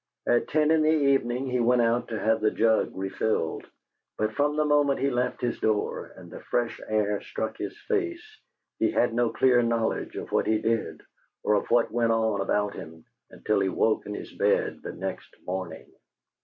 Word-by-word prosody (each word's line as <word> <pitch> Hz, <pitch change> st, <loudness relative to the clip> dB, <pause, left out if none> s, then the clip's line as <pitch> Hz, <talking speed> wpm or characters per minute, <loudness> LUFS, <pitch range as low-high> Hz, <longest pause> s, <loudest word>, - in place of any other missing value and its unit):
At 120 Hz, -, +2 dB
ten 155 Hz, 0 st, +2 dB
in 160 Hz, -1 st, +4 dB
the 155 Hz, -, +3 dB
evening 135 Hz, -4 st, +2 dB
he 125 Hz, -, +1 dB
went 120 Hz, 0 st, +3 dB
out 115 Hz, +1 st, +1 dB
to 110 Hz, -2 st, -4 dB
have 110 Hz, 0 st, +1 dB
the 110 Hz, -, +3 dB
jug 110 Hz, 0 st, +2 dB
refilled, 95 Hz, -2 st, -2 dB, 0.5 s
but 110 Hz, 0 st, -1 dB
from 145 Hz, +6 st, +1 dB
the 155 Hz, -, +2 dB
moment 145 Hz, -2 st, +3 dB
he 140 Hz, +1 st, +1 dB
left 125 Hz, 0 st, -1 dB
his 120 Hz, -1 st, -2 dB
door 110 Hz, -1 st, -1 dB
and -, -, -12 dB
the -, -, -8 dB
fresh 120 Hz, -1 st, -2 dB
air 105 Hz, -1 st, 0 dB
struck -, -, -4 dB
his -, -, -5 dB
face, 360 Hz, -6 st, -1 dB, 0.6 s
he -, -, +3 dB
had 120 Hz, -1 st, +1 dB
no 120 Hz, 0 st, +2 dB
clear 125 Hz, 0 st, +3 dB
knowledge 115 Hz, -1 st, -1 dB
of -, -, -6 dB
what -, -, +1 dB
he 110 Hz, -, +3 dB
did 115 Hz, 0 st, -1 dB, 0.4 s
or -, -, +2 dB
of 105 Hz, -, 0 dB
what 120 Hz, -1 st, +3 dB
went 115 Hz, -1 st, +1 dB
on 110 Hz, -3 st, +1 dB
about 105 Hz, +1 st, 0 dB
him 80 Hz, 0 st, -10 dB, 0.2 s
until 105 Hz, -2 st, -1 dB
he 95 Hz, -1 st, +1 dB
woke 110 Hz, +3 st, +1 dB
in 105 Hz, -, -4 dB
his -, -, -8 dB
bed -, -, +1 dB
the -, -, -6 dB
next -, -, -6 dB
morning. 95 Hz, -1 st, -5 dB
115 Hz, 195 wpm, -26 LUFS, 110-130 Hz, 0.6 s, in